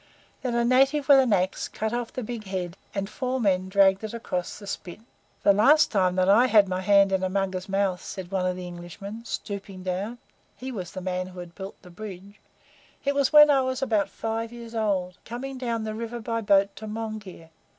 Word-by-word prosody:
Then 245 -2 -2
a 235 0 +2
native 270 +3 +3
with 280 -2 +8
an 255 -3 +3
axe 185 -2 +1
cut 220 +1 -3
off 240 -1 -2
the 255 - -5
big 225 -1 -6
head, 185 -2 -4 0.2
and 195 -1 -1
four 255 +4 -2
men 190 -4 +1
dragged 195 0 +4
it 220 +1 -5
across 180 -6 -4
the 210 - -11
spit. 180 -1 -6 0.4
"The 200 - +6
last 275 +10 +5
time 185 -3 +2
that 185 0 +2
I 225 +6 +6
had 210 -5 +5
my 185 0 -2
hand 200 0 +5
in 190 -1 +1
a 185 - 0
Mugger's 190 0 -2
mouth," 195 -2 0
said 185 -2 -7
one 185 -1 0
of 180 - -1
the 180 0 -6
Englishmen, 180 +5 -8
stooping 195 -4 -6
down 190 +6 -3 0.4
(he 260 +1 -6
was 185 -7 -6
the 185 - -5
man 185 0 -2
who 185 -1 -10
had 175 -1 -9
built 190 +1 -8
the 180 - -13
bridge), 200 +1 -9 0.7
"it 280 - +2
was 280 -2 +2
when 300 -1 +9
I 275 -2 +4
was 260 +1 -2
about 210 -6 +1
five 225 +2 -3
years 235 -1 -10
old 195 -5 -1
coming 260 +3 -6
down 235 -3 -2
the 215 0 -3
river 230 +2 -5
by 230 0 -2
boat 200 -1 +3
to 215 +2 -7
Monghyr. 215 -6 -6
205 Hz, 215 wpm, -26 LUFS, 185-235 Hz, 0.7 s, when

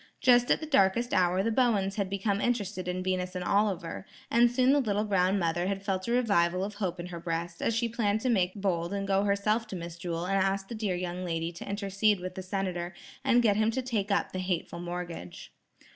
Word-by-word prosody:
Just 245 -1 +5
at - - +4
the 315 - -5
darkest 240 -4 +2
hour 185 +1 +3
the 230 - +1
Bowens 220 -6 +2
had 200 -2 -1
become 200 +1 -1
interested 205 -6 -1
in 180 0 -2
Venus 185 0 -2
and 180 - -2
Oliver, 190 -3 0 0.2
and 235 +1 +5
soon 255 +2 +3
the 290 - +4
little 210 -5 0
brown 195 -2 +2
mother 175 0 0
had 195 0 -2
felt 190 -1 -2
a - - -1
revival 190 -7 +2
of 205 +2 -4
hope 185 -4 -3
in 175 - -4
her 175 -1 -7
breast, 170 0 -4
as 230 - +1
she 235 +1 +1
planned 220 -2 0
to 255 - -1
make 185 -6 +2
bold 185 -3 -1
and 195 0 -3
go 195 +1 +2
herself 210 +3 +1
to 200 - -6
Miss 170 -1 -7
Jewel 170 0 -3
and 195 +1 +1
ask 195 0 0
the - - -5
dear 215 -5 -1
young 180 0 -4
lady 165 -1 -2
to 170 - -9
intercede 200 0 +1
with 180 0 -5
the 190 - -6
Senator 185 -2 -3 0.3
and 245 -3 +4
get 210 -3 +3
him 215 0 +3
to 260 +3 -2
take 220 -5 -2
up 200 - +1
the 185 - -4
hateful 180 -2 -2
mortgage. 175 - -6
195 Hz, 230 wpm, -29 LUFS, 180-215 Hz, 0.3 s, Just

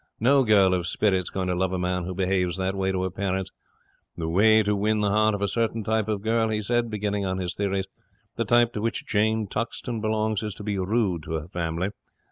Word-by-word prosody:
No 135 +4 +4
girl 100 -5 +4
of 90 -1 -1
spirit's 95 -1 +1
going 95 -1 -3
to 90 - +1
love 95 +1 0
a - - 0
man 90 0 -1
who 90 +1 -5
behaves 90 -1 0
that 95 0 -1
way 95 -1 0
to 95 -1 -1
her 95 - -2
parents. 95 0 -2 0.7
The 80 -1 -3
way 110 +6 +5
to 105 0 +1
win 105 +1 +1
the 100 -1 +1
heart 110 0 +3
of 100 - -3
a - - +2
certain 115 +1 -1
type 110 0 0
of 105 -2 -2
girl," 115 0 +1
he 110 -1 0
says, 120 +2 +1
beginning 105 -1 -2
on 95 -1 -1
his 90 -2 -3
theories, 100 -1 -1 0.5
"the - - 0
type 120 0 +3
to 105 - -3
which 115 +1 -2
Jane 110 +1 +1
Tuxton 115 +2 -4
belongs, 110 -1 0
is 105 -3 -4
to - - -9
be 100 -2 -2
rude 95 -3 0
to - - -5
her 80 -1 -3
family. 85 +1 -2
100 Hz, 235 wpm, -25 LUFS, 95-110 Hz, 0.7 s, way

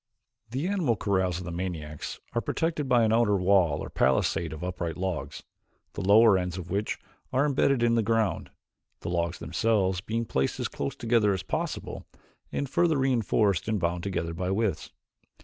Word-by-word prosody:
The 135 +8 -2
animal 180 - +1
corrals 95 -3 0
of 90 - -6
the 85 - -5
maniacs 85 -4 -5
are 120 - 0
protected 155 - -1
by 120 -2 +5
an 110 0 +3
outer 115 -3 +3
wall 90 -5 +3
or - - -6
palisade 80 +5 +1
of 80 +2 -7
upright 90 -2 -3
logs, 90 -5 -4 0.5
the - - -4
lower 105 0 +6
ends 90 0 -3
of 90 -1 -7
which 100 +3 -1 0.3
are 130 +3 +2
imbedded 140 -3 +2
in 120 0 +3
the 115 - +3
ground, 110 -6 0 0.5
the - - -4
logs 85 0 -1
themselves 95 -1 0
being 115 +4 -2
placed 65 -9 -1
as - - -1
close 135 - -4
together 115 -5 +2
as 95 - -5
possible - - -4 0.4
and 140 - -2
further 165 +3 +2
reinforced 115 -8 +1
and 110 -2 0
bound 85 0 -1
together 85 -3 -3
by 90 +2 -3
withes. 100 +1 -1
100 Hz, 175 wpm, -27 LUFS, 90-115 Hz, 0.5 s, lower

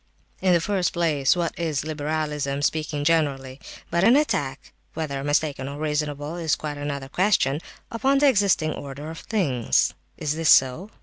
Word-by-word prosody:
"In 185 -1 +3
the 170 - +4
first 190 +1 0
place, 155 -5 +2
what 170 -2 -1
is 155 -5 -1
liberalism, 150 -2 -2
speaking 150 -1 -1
generally, 140 -4 0 0.3
but 170 +1 +2
an 230 +5 +6
attack 145 - -1 0.2
(whether 140 -4 -3
mistaken 145 -2 0
or 140 - -7
reasonable, 150 +1 -2
is 160 -4 +1
quite 150 -1 -6
another 140 -2 -4
question) 155 -3 +1 0.3
upon 265 +5 +2
the 285 +1 +4
existing 200 - +2
order 145 +2 -7
of 165 - -8
things? 140 - +1 0.2
Is 150 -1 -1
this 160 0 0
so? 135 +10 +4
155 Hz, 160 wpm, -24 LUFS, 140-170 Hz, 0.3 s, an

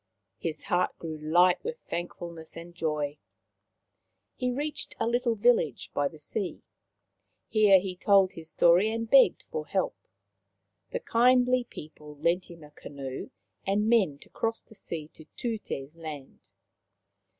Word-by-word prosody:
His 155 -2 -4
heart 180 +1 0
grew 160 -2 -6
light 175 +4 +4
with 475 +2 -4
thankfulness 170 -2 -6
and 170 +1 -9
joy. 150 -3 -2 1.2
He 250 - -1
reached 290 +4 -4
a - - +1
little 235 0 +1
village 225 -7 +2
by 145 0 +1
the 155 - -11
sea. 180 +6 -4 0.9
Here 210 -3 +6
he 185 -1 -5
told 195 -1 +4
his 160 -1 -7
story 175 +6 +5
and 230 0 -2
begged 270 +3 +6
for 470 -1 -4
help. - - 0 0.9
The - - -3
kindly 250 - +4
people 150 -5 -11
lent 170 +5 +1
him 165 -2 -12
a 150 - -14
canoe 135 -3 -7 0.3
and 205 +2 +1
men 200 -11 +3
to - - -22
cross 225 0 -2
the - - -18
sea 160 -7 -6
to 160 - -16
Tute's 185 - -4
land. 155 -5 -8
180 Hz, 140 wpm, -28 LUFS, 155-230 Hz, 1.2 s, Here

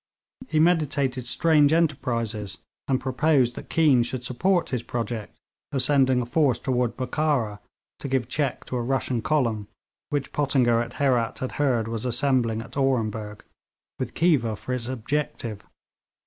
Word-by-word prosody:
He 155 - +1
meditated 145 -6 +1
strange 150 +1 +4
enterprises, 115 - -1 0.3
and 130 -2 +1
proposed 130 -1 +2
that - - -10
Keane 150 -7 +4
should 120 +1 -3
support 175 +9 +1
his 125 -3 -1
project 115 -2 -4 0.3
of 135 -2 0
sending 130 -2 +3
a - - -3
force 130 -1 +2
toward 125 -1 -1
Bokhara 130 -6 0 0.4
to - - -5
give 130 -4 0
check 140 0 -2
to 125 - -3
a - - -1
Russian 130 -1 -1
column 115 -8 0 0.4
which 145 -2 -2
Pottinger 130 -5 +2
at 120 +1 -5
Herat 125 -5 +1
had 130 - -4
heard 120 -6 +2
was 115 -1 -4
assembling 120 -3 +1
at 115 - -14
Orenburg, 110 -6 -1 0.6
with 130 -3 -4
Khiva 140 -10 +2
for 125 - -5
its 120 -2 -3
objective. 125 -3 -3
130 Hz, 150 wpm, -25 LUFS, 115-145 Hz, 0.6 s, strange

